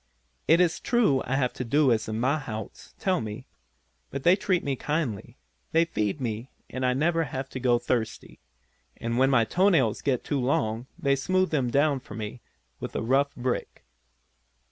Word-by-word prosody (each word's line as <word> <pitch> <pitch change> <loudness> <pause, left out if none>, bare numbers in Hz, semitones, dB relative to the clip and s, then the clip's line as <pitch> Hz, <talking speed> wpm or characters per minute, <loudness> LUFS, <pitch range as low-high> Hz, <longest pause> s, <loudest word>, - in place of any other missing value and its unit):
It 165 +2 +6
is 175 -2 +2
true 220 - +2
I 135 - 0
have 130 -2 +1
to - - -4
do 140 +3 +3
as 110 -2 +1
the - - -3
mahouts 115 -2 -3
tell 185 -2 0
me, 110 +4 -6 0.6
but 140 -1 -5
they 175 +4 +6
treat 190 -3 0
me 140 -2 -1
kindly, 145 - -3 0.4
they 165 +1 +5
feed 105 -4 -2
me 115 0 -4 0.2
and 130 - -4
I 125 0 +3
never 165 +4 +1
have 135 -1 -5
to 130 - -6
go 120 -1 +3
thirsty, 120 -2 -3 0.6
and 115 +1 -2
when 135 +1 +5
my 125 -4 +4
toe 185 - +3
nails 130 - +2
get 130 -4 0
too 145 - -1
long 120 -2 0
they 140 -6 +2
smooth 185 +7 +1
them 135 -6 +1
down 140 +2 +2
for - - -11
me 110 +2 -6 0.4
with - - -6
a - - -1
rough 135 +4 +2
brick. 125 0 -3
130 Hz, 185 wpm, -27 LUFS, 120-155 Hz, 0.6 s, It